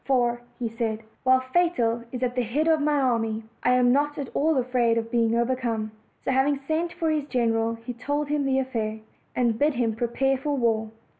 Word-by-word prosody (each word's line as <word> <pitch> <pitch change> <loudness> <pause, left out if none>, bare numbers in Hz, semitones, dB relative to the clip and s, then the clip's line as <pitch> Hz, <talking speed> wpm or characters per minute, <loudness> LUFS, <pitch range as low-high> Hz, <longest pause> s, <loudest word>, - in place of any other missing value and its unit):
"For," 240 -3 +1 0.3
said 225 -1 -3
he, - - -25 0.2
"while 260 0 +4
Fatal 255 -5 +1
is 255 0 -4
at 245 -1 0
the 250 - 0
head 265 +8 0
of 320 -2 +3
my 295 0 +2
army, 225 -4 0 0.2
I 250 - +3
am 250 -1 +4
not 290 +2 +1
at 280 -3 -4
all 315 0 +2
afraid 245 -2 +2
of 230 0 -2
being 230 -1 +2
overcome." 235 -3 -1 0.3
So, - - +1
having 270 +2 +2
sent 330 +2 0
for 325 -2 0
his 300 -2 0
general, 230 -3 +1
he 230 +2 -7
told 285 +5 -2
him 295 0 0
the 265 -1 +2
affair, 225 -5 -2 0.3
and 235 -3 +1
bid 295 -1 +2
him 230 -2 0
prepare 255 +3 0
for 285 +1 -1
war. 225 -3 +1
250 Hz, 205 wpm, -25 LUFS, 230-280 Hz, 0.3 s, while